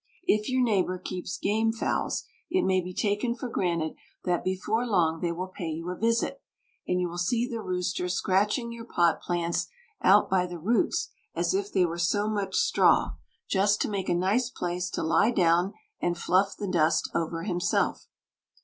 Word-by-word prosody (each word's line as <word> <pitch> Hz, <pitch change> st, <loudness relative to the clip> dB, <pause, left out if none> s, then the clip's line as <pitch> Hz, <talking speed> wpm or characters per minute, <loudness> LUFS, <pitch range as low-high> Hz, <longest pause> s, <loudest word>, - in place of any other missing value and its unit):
If 215 Hz, -10 st, +2 dB
your 255 Hz, 0 st, +2 dB
neighbour 190 Hz, -5 st, +1 dB
keeps 180 Hz, 0 st, -5 dB
game 220 Hz, +2 st, +1 dB
fowls, 225 Hz, -, -1 dB, 0.3 s
it 370 Hz, +1 st, +2 dB
may 185 Hz, -1 st, +3 dB
be 180 Hz, +1 st, -6 dB
taken 210 Hz, +5 st, 0 dB
for 250 Hz, +1 st, -5 dB
granted 170 Hz, -8 st, -1 dB, 0.3 s
that 180 Hz, -1 st, 0 dB
before 190 Hz, +5 st, 0 dB
long 170 Hz, -8 st, +1 dB
they 170 Hz, -, 0 dB
will 180 Hz, +2 st, -4 dB
pay 180 Hz, -2 st, -6 dB
you 165 Hz, +3 st, -4 dB
a -, -, -4 dB
visit, 230 Hz, -, 0 dB, 0.5 s
and 180 Hz, -, +1 dB
you 180 Hz, -, 0 dB
will 175 Hz, +1 st, -6 dB
see 230 Hz, +7 st, +1 dB
the 230 Hz, -3 st, -4 dB
rooster 180 Hz, -1 st, -2 dB
scratching 210 Hz, +7 st, +1 dB
your 235 Hz, 0 st, -8 dB
pot 170 Hz, -7 st, +2 dB
plants 170 Hz, -1 st, -1 dB, 0.3 s
out 200 Hz, +3 st, +6 dB
by 185 Hz, -1 st, +1 dB
the 175 Hz, -1 st, -6 dB
roots 210 Hz, +9 st, +1 dB, 0.3 s
as -, -, 0 dB
if 395 Hz, +1 st, -1 dB
they 180 Hz, -, +3 dB
were 170 Hz, 0 st, -4 dB
so 205 Hz, +5 st, +1 dB
much 200 Hz, -3 st, -2 dB
straw, -, -, +3 dB, 0.3 s
just 200 Hz, +1 st, +2 dB
to -, -, 0 dB
make 195 Hz, -2 st, -2 dB
a 175 Hz, -, +2 dB
nice 205 Hz, +8 st, +1 dB
place 180 Hz, -5 st, -3 dB
to -, -, -3 dB
lie 200 Hz, +7 st, +3 dB
down 180 Hz, -3 st, +2 dB, 0.3 s
and 175 Hz, 0 st, 0 dB
fluff 190 Hz, +3 st, +1 dB
the 205 Hz, -, -4 dB
dust 165 Hz, -3 st, +2 dB
over 165 Hz, 0 st, -2 dB
himself. 180 Hz, -2 st, 0 dB
185 Hz, 185 wpm, -27 LUFS, 175-215 Hz, 0.5 s, out